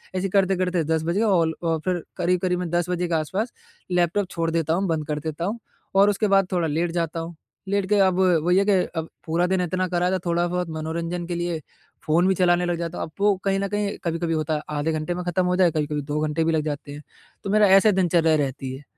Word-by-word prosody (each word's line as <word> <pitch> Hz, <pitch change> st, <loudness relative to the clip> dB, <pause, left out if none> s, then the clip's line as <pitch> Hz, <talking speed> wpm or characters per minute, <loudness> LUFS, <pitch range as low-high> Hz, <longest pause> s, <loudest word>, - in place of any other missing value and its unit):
ऐसे 190 Hz, +1 st, -1 dB
करते-करते 185 Hz, -3 st, +1 dB
10 160 Hz, +1 st, 0 dB
बज 170 Hz, +3 st, -1 dB
गए 220 Hz, -, +2 dB
और 175 Hz, -7 st, +3 dB
अ, 165 Hz, -1 st, +1 dB
फिर 180 Hz, -3 st, -1 dB
करीब-करीब 180 Hz, 0 st, +1 dB
मैं 180 Hz, -, -3 dB
10 175 Hz, +1 st, 0 dB
बजे 180 Hz, 0 st, -1 dB
के 170 Hz, -, -3 dB
आस-पास 190 Hz, +10 st, -2 dB, 0.4 s
लैपटॉप 180 Hz, +2 st, +1 dB
छोड़ 165 Hz, -1 st, -1 dB
देता 160 Hz, -1 st, 0 dB
हूँ, 190 Hz, +3 st, 0 dB
बंद 160 Hz, -2 st, -1 dB
कर 150 Hz, -1 st, -2 dB
देता 160 Hz, +2 st, -4 dB
हूँ 220 Hz, +5 st, -3 dB, 0.4 s
और 200 Hz, +1 st, +6 dB
उसके 205 Hz, +1 st, +1 dB
बाद 195 Hz, -1 st, +3 dB
थोड़ा 175 Hz, -3 st, +1 dB
लेट 165 Hz, +3 st, -1 dB
जाता 165 Hz, -1 st, -2 dB
हूँ। 165 Hz, +1 st, -6 dB, 0.3 s
लेट 200 Hz, 0 st, 0 dB
के 210 Hz, -, +3 dB
अब 190 Hz, -1 st, +3 dB, 0.2 s
वही 180 Hz, +2 st, +3 dB
है 195 Hz, -, +4 dB
कि 205 Hz, -, +3 dB, 0.3 s
अब 160 Hz, -, -4 dB, 0.2 s
पूरा 170 Hz, +2 st, +1 dB
दिन 185 Hz, 0 st, +1 dB
इतना 185 Hz, +1 st, -1 dB
करा 180 Hz, 0 st, 0 dB
था 190 Hz, -, +1 dB
थोड़ा 170 Hz, 0 st, +1 dB
बहुत 180 Hz, -1 st, -2 dB
मनोरंजन 165 Hz, +2 st, -4 dB
के 175 Hz, -, -3 dB
लिए 175 Hz, -1 st, -2 dB, 0.5 s
फ़ोन 170 Hz, +4 st, +3 dB
भी 190 Hz, -, +3 dB
चलाने 175 Hz, -1 st, +3 dB
लग 175 Hz, -1 st, -1 dB
जाता 170 Hz, 0 st, -4 dB
हूँ -, -, -2 dB
अब 160 Hz, -, -17 dB
वो 205 Hz, -1 st, +4 dB
कहीं 195 Hz, 0 st, +1 dB
न 200 Hz, -, -1 dB
कहीं 205 Hz, 0 st, -2 dB
कभी-कभी 165 Hz, -1 st, -1 dB
होता 155 Hz, 0 st, -1 dB
है 150 Hz, -, -2 dB, 0.2 s
आधे 150 Hz, +3 st, 0 dB
घंटे 155 Hz, +3 st, -2 dB
में 180 Hz, +1 st, -4 dB
ख़त्म 180 Hz, +1 st, 0 dB
हो 180 Hz, 0 st, +1 dB
जाए 180 Hz, -3 st, +4 dB
कभी-कभी 150 Hz, -1 st, -2 dB
2 145 Hz, +1 st, -3 dB
घंटे 160 Hz, +2 st, 0 dB
भी 165 Hz, -, +1 dB
लग 160 Hz, -1 st, +1 dB
जाते 145 Hz, -1 st, -4 dB
हैं 145 Hz, +1 st, -8 dB, 0.4 s
तो 195 Hz, -, -4 dB
मेरा 210 Hz, 0 st, +5 dB
ऐसे 215 Hz, +2 st, +4 dB
दिनचर्या 170 Hz, -4 st, +3 dB
रहती 135 Hz, -1 st, -5 dB
है। 140 Hz, -, -12 dB
175 Hz, 250 wpm, -24 LUFS, 160-185 Hz, 0.5 s, और